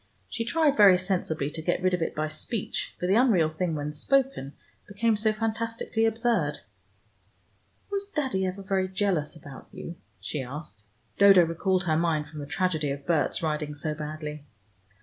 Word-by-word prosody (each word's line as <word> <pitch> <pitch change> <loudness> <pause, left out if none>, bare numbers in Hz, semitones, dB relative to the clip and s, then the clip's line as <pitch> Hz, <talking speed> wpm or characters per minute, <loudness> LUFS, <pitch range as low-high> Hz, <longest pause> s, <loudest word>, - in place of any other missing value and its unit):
She 230 - -3
tried, 295 +3 +2
very 200 -5 +8
sensibly, 175 -6 -1
to 160 - -6
get 175 +2 0
rid 185 0 +3
of 180 - 0
it 165 - -2
by 155 +1 -1
speech, 185 +8 -3
for - - -2
the 185 - +3
unreal 210 -9 +4
thing 160 +1 -2
when 150 0 -3
spoken, 265 - 0 0.3
became 215 +2 +1
so 215 +1 +2
fantastically 225 +1 -1
absurd. 230 +1 0 1.3
"Was 400 0 -2
Daddy 270 - -1
ever 190 +2 -5
very 190 -1 0
jealous 185 -6 -1
about 145 -3 -11
you?" 170 - -8 0.2
she 120 - -4
asked. 125 -5 -8 0.3
Dodo 195 -3 +8
recalled 185 +3 0
her 160 -3 +1
mind 160 -3 +1
from 155 - -9
the 145 - -6
tragedy 160 -2 0
of 140 0 -5
Berts 160 -2 +1
riding 150 -1 -2
so 150 +1 -3
badly. 150 -1 -6
180 Hz, 170 wpm, -27 LUFS, 150-215 Hz, 1.3 s, very